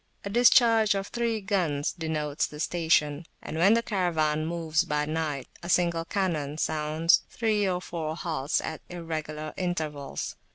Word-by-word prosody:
A 200 - -4
discharge 230 -2 +5
of 195 0 -3
three 235 -2 -1
guns 175 -8 0
denotes 155 -3 -2
the 150 - -10
station, 160 -2 +1
and - - -7
when 195 +6 +6
the 230 - +1
Caravan 160 -7 0
moves 165 -1 0
by 150 -3 -1
night 155 -3 -2
a 170 - -7
single 170 -2 +2
cannon 165 -6 -1
sounds 155 +1 +2
three 210 -3 +1
or 180 -1 0
four 160 -3 -4
halts 155 -5 -1
at 160 -1 -5
irregular 155 -3 -5
intervals. 155 -6 -3
165 Hz, 150 wpm, -27 LUFS, 155-185 Hz, -, when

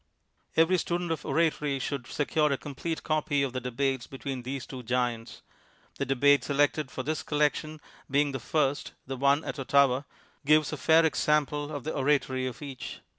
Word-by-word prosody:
Every 170 +3 +4
student 175 0 -2
of 160 - -3
oratory 150 -4 +1
should 130 -2 -4
secure 150 0 +1
a 140 - +1
com 145 - -8
plete 160 +2 -4
copy 150 -2 +1
of 135 -2 -2
the 130 - -3
debates 125 0 -1
between 135 -1 -5
these 130 +1 -5
two 130 -2 -8
giants. 120 -1 -2 0.6
The 140 - -1
debate 140 +2 +4
selected 145 0 +1
for 130 - -5
this 155 +3 -2
collection 150 +1 0 0.3
being 145 +1 +2
the 135 - -4
first 145 +2 -1
(the 135 - -4
one 140 +3 +3
at - - -5
Ottawa), 135 -1 +3 0.4
gives 155 +1 +3
a - - -3
fair 160 +1 +5
example 150 -1 +1
of 145 -4 -5
the 155 - -3
oratory 135 -2 +1
of 125 +3 -7
each. 135 -3 -7
140 Hz, 175 wpm, -28 LUFS, 130-150 Hz, 0.6 s, fair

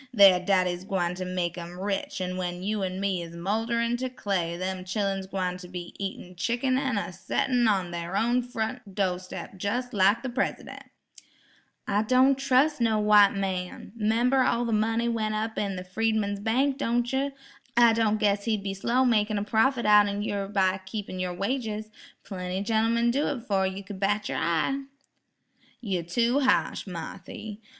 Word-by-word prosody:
Thar 195 -3 +8
daddy's 180 -1 +1
gwine 180 -3 -1
ter 185 +1 -5
make 180 -1 -2
'em 175 +1 -8
rich 195 -1 -3
an' 185 0 -2
when 180 -1 -4
you 210 +1 -1
an' 185 0 -2
me 195 -2 0
is 170 0 -8
moulderin' 230 +6 0
ter 260 +1 -3
clay 190 -8 -2
dem 185 0 -3
chillun's 195 0 -2
gwine 185 -2 -2
ter 180 - -10
be 175 -1 -7
eatin' 190 -2 -6
chickun 240 +7 0
an' 265 -5 -1
a 195 - -3
settin' 240 +6 +1
on 190 -4 +1
thar 170 +2 -3
own 240 +3 +2
front 235 -3 -5
do' 185 -3 0
steps 185 +1 -8
jes' 245 +5 -2
like 200 +3 +3
de 265 - -2
Presidun'." 255 +2 -3 1.0
"I 205 +1 +2
don' 255 +4 +4
trus' 270 +2 +2
no' 225 -2 +3
white 210 -1 +6
man. 185 -2 -3
'Member 235 +4 +2
all 240 -1 +2
the 230 - -2
money 225 +2 +1
went 215 -2 -1
up 220 +1 -2
in 200 -2 -1
the 180 - -5
Freedman's 205 +1 -1
bank, 260 +6 +1
don' 240 -2 +1
yer? 270 +3 -1 0.4
I 235 -1 +7
don' 220 -1 +2
guess 200 -1 +1
he'd 215 -3 0
be 195 -1 -2
slow 235 +6 +1
makin' 215 -3 +2
a 200 - -1
profit 235 +4 +2
outen 205 -1 +4
yer 200 -2 -2
by 190 -2 +1
keepin' 190 -1 -6
yer 180 -1 -1
wages. 215 +1 -3 0.3
Plenty 185 -1 -4
gentmen'd 230 +2 +2
do 285 +3 +1
it 265 -5 -3
'fore 195 -5 +1
yer 190 +1 -5
could 190 0 -8
bat 205 +2 0
yer - - -2
eye." 170 - 0 1.0
"You 195 -7 -2
tew 235 - +1
ha'sh, 260 -5 +1
Marthy. 190 +4 -7
205 Hz, 180 wpm, -27 LUFS, 185-235 Hz, 1.0 s, Thar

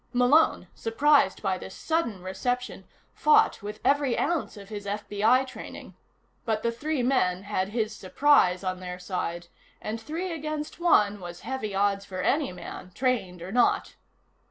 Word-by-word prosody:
Malone, 250 +6 +4
surprised 230 -3 +2
by 190 -2 0
this 190 - -9
sudden 235 - -1
reception, 245 +7 -3 0.3
fought 440 -1 +4
with 210 +1 -7
every 280 -3 +2
ounce 320 -7 -1
of 200 0 -11
his 205 -2 -6
FBI 210 +5 +2
training. 255 - -9 0.5
But 220 -2 -1
the 235 - +1
three 290 +3 -2
men 190 -8 +1
had 200 -2 -1
his 215 -1 -2
surprise 185 -3 +3
on 185 -1 -2
their 180 -1 -6
side, 180 -2 -4 0.3
and 220 +1 -5
three 335 +8 -4
against 305 -1 -4
one 210 -12 +3
was 175 -1 -8
heavy 240 -7 -4
odds 200 0 +1
for 185 -2 -5
any 280 +5 +1
man, 180 0 -9
trained 200 -10 -1
or 185 - -7
not. 245 +2 +2
215 Hz, 155 wpm, -27 LUFS, 190-270 Hz, 0.5 s, Malone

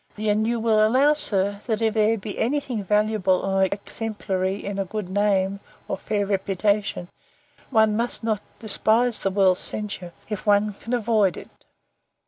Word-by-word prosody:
And 215 +1 +1
you 235 0 0
will 220 -1 +3
allow, 260 +7 +4
sir, 200 -7 0
that, 220 -2 0
if 225 -1 +1
there 220 +1 +2
be 205 0 -7
any 270 +6 +1
thing 245 -7 -4
valuable 210 -1 +2
or 195 0 +2
exemplary 200 -1 -3
in 200 0 -5
a 195 - 0
good 210 0 -5
name, 200 0 +1 0.3
or - - -2
fair 205 -1 -2
reputation, 195 -1 0 0.6
one 220 -4 +3
must 235 +1 -1
not 215 -2 0 0.2
despise 225 +2 +1
the 195 - +1
world's 190 -1 +3
censure, 200 -4 -4 0.2
if 210 -2 -5
one 205 0 +3
can 230 +4 -7
avoid 215 -5 +2
it. - - -10
210 Hz, 160 wpm, -24 LUFS, 195-220 Hz, 0.6 s, allow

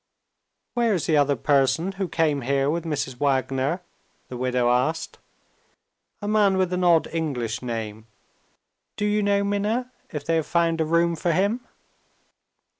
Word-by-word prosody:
"Where 235 -4 +2
is 170 - -2
the 160 - +2
other 145 -1 +3
person 145 +7 +2
who 195 -1 -3
came 155 -4 +1
here 135 +2 +1
with 170 +1 -2
Mrs. 145 -5 -3
Wagner?" 135 +4 0 0.5
the 125 - -6
widow 125 -1 +1
asked. 130 +7 -1 1.0
"A - - -2
man 205 -2 +3
with 185 -1 +1
an 180 0 0
odd 170 -2 +5
English 125 -9 -2
name. 110 -3 -5 0.9
Do 210 - -1
you 210 0 +2
know, 200 0 +2
Minna, 210 +5 -1 0.2
if 150 -2 -6
they 165 +1 +2
have 160 - -1
found 165 -1 +1
a - - +2
room 170 +1 +2
for 170 +2 0
him?" 205 +8 0
165 Hz, 155 wpm, -24 LUFS, 135-190 Hz, 1.0 s, odd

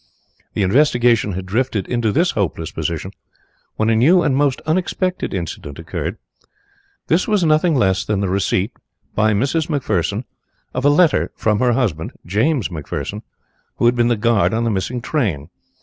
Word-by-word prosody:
The - - +1
investigation 120 -1 +3
had 95 +1 -5
drifted 110 0 -1
into 120 -3 0
this 170 - +2
hopeless 85 -5 -2
position - - -3 0.6
when 110 +1 +1
a - - +3
new 165 +11 +5
and 135 - +1
most 140 -1 +1
unexpected 185 +3 -1
incident - - -5
occurred. - - -4 0.9
This 170 +3 +1
was 210 -4 +2
nothing 155 +1 +3
less 95 -7 +2
than 105 -2 -1
the 100 - 0
receipt 95 +2 0 0.4
by 110 0 +2
Mrs. 140 +9 0
McPherson 105 - -1 0.5
of 130 +2 -2
a - - +7
letter 165 +3 +3
from 105 -1 +1
her 125 -1 +3
husband, 100 - -1
James 110 - +1
McPherson, 80 -5 -5 0.5
who - - 0
had 120 +1 +4
been 120 -1 +2
the 120 - +2
guard 110 0 +2
on 115 - 0
the 115 - +1
missing 115 +5 -2
train. 100 - -2
120 Hz, 165 wpm, -19 LUFS, 100-145 Hz, 0.9 s, a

